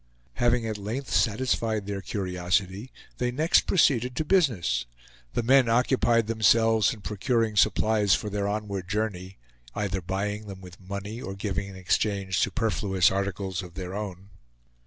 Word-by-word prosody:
Having 120 -1 +2
at 110 -2 -3
length 115 +7 -5
satisfied 110 -2 +1
their 100 -1 -4
curiosity, 95 +3 -2 0.3
they 125 - +1
next 155 +7 +2
proceeded 125 -8 +2
to 155 - -1
business. 110 - +1 0.5
The 120 - +1
men 130 0 +5
occupied 120 -1 +3
themselves 110 -1 +3
in 110 - -8
procuring 110 +2 -1
supplies 105 0 +3
for - - -4
their 100 0 -1
onward 100 -3 -3
journey; 100 -3 -3 0.4
either 100 -2 -2
buying 100 +4 -3
them 95 -2 -8
with 90 0 -13
money 100 +5 -6
or 95 -4 -6
giving 100 -1 -3
in 100 - -10
exchange 95 +1 0
superfluous 100 -6 +1
articles 95 -2 -2
of 90 -2 -11
their 90 -1 -6
own. 100 -2 -6
105 Hz, 145 wpm, -26 LUFS, 95-115 Hz, 0.5 s, men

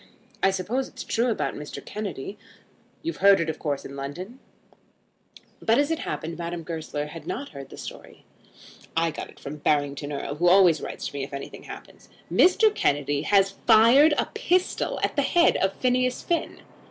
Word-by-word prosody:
"I 195 - +5
suppose 205 +8 -2
it's - - -9
true 235 +2 0
about 225 - -1
Mr. 150 - -8
Kennedy. 200 -5 -5 0.7
You've 335 +1 -3
heard 200 +1 +7
of - - -1
it 165 - -1
of 155 - -12
course 145 -3 -3
in 140 - -8
London." 175 - -7 1.2
But 225 +1 +3
as 290 +2 +2
it 325 - -1
happened 165 +1 -5
Madame 170 0 -4
Goesler 155 -3 -4
had 155 +1 -10
not 280 +4 -4
heard 140 -2 -10
the - - -11
story. - - -10 0.7
"I 165 0 +2
got - - -7
it - - -17
from 150 +2 -7
Barrington 145 -1 0
Erle, 145 0 -4
who 175 +3 +2
always 180 -4 +5
writes - - -6
to - - -18
me 140 -1 -3
if 140 - -8
anything 140 - -8
happens. - - -12 0.2
Mr. 420 +4 +5
Kennedy 145 - 0
has 195 +3 +3 0.2
fired 245 +7 +7
a - - +2
pistol 365 +1 0
at - - 0
the - - +3
head 345 -1 +4
of 195 0 +1
Phineas 255 +1 0
Finn." 340 - -2
175 Hz, 185 wpm, -25 LUFS, 150-245 Hz, 1.2 s, heard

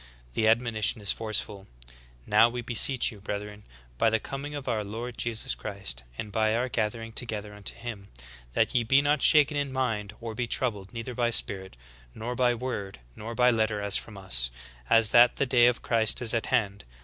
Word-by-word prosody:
The 110 - +1
admonition 115 -1 +2
is 100 -2 +2
forceful: 105 -3 -2 0.6
"Now 115 - +5
we 120 0 -5
beseech 125 +2 +4
you, 105 - -13
brethren, 105 +1 -6 0.3
by 115 - +4
the 110 0 +1
coming 140 +5 -6
of 140 -2 -7
our 110 -2 -1
Lord 115 +4 -6
Jesus 115 +2 -2
Christ, 95 -12 -4
and 105 - -6
by 110 +1 +1
our 125 +2 -1
gathering 115 0 -3
together 110 -3 -2
unto 105 -1 -6
him, 110 -5 -8 0.5
That - - +1
ye 125 - +3
be 135 +5 +3
not 145 0 +2
soon - - +6
shaken 150 -1 +4
in 145 -1 -2
mind, 110 -6 -2
or 115 -1 -6
be 120 +2 -3
troubled, 105 -6 -2
neither 115 +1 -6
by 120 0 0
spirit, 95 - -1 0.4
nor 115 +3 -5
by 125 -1 +2
word, 110 - -5 0.2
nor 115 +2 -7
by 125 +1 +4
letter 110 -2 0
as 100 0 0
from 105 -3 -3
us, 60 -12 +1 0.4
as 115 -2 +5
that 120 0 +6
the 140 - 0
day 120 -2 +4
of 125 -1 0
Christ 115 -2 +3
is 120 -2 +1
at 115 - -1
hand. 100 -2 -1
115 Hz, 195 wpm, -27 LUFS, 105-125 Hz, 0.6 s, soon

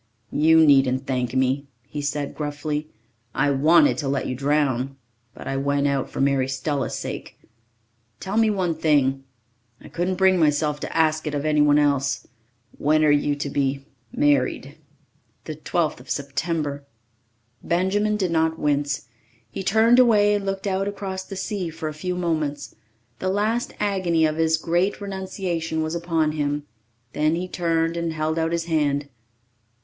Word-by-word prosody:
"You 160 +1 +5
needn't 135 -2 +4
thank 125 -2 -2
me," 130 +2 +1 0.2
he 145 +2 -6
said 145 0 -3
gruffly. 150 0 -4 0.5
"I 140 +2 +2
wanted 160 - +4
to 145 - -2
let 135 0 -1
you - - -2
drown. 135 -1 0 0.4
But - - -10
I 135 - -2
went 140 +1 0
out 140 -2 -1
for - - -7
Mary 135 -1 +2
Stella's 135 -1 -2
sake. - - -6 0.8
Tell 195 +2 -4
me 225 0 +4
one 185 -5 0
thing 140 -4 +1 0.5
I - - -13
couldn't 180 +2 -1
bring 190 -1 +4
myself 150 -1 +2
to - - -5
ask 155 -1 +2
it 150 - -2
of 145 +1 -2
anyone 150 -1 +4
else. 140 -2 +1 0.5
When 155 +2 +3
are 150 - +5
you 145 0 +2
to 145 0 -4
be 135 0 -1 0.3
married?" 145 -3 +1 0.7
"The 155 - -6
12th 155 0 -1
of 130 +1 -15
September." 145 +1 -2 0.8
Benjamin 205 +5 +1
did 185 -4 -1
not 160 0 +1
wince. 145 -3 -1 0.4
He - - -5
turned 220 +5 +4
away 210 -4 +5
and 200 -1 -1
looked 195 0 -3
out 195 0 0
across 195 -2 -4
the 195 - -8
sea 190 -2 -3
for 160 0 -6
a 155 - -4
few 180 +4 -3
moments. 155 -5 -2 0.5
The 185 - -1
last 215 +5 0
agony 185 -6 +1
of 155 0 -1
his 160 0 +2
great 175 +5 0
renunciation 185 -5 -3
was 155 +1 -3
upon 165 -2 0
him. 145 -1 -2 0.5
Then 155 +2 +1
he 180 +2 -3
turned 165 -2 0
and 170 -1 -2
held 155 +1 -1
out 165 0 0
his 170 -1 -1
hand. 145 -3 0
155 Hz, 160 wpm, -23 LUFS, 145-180 Hz, 0.8 s, You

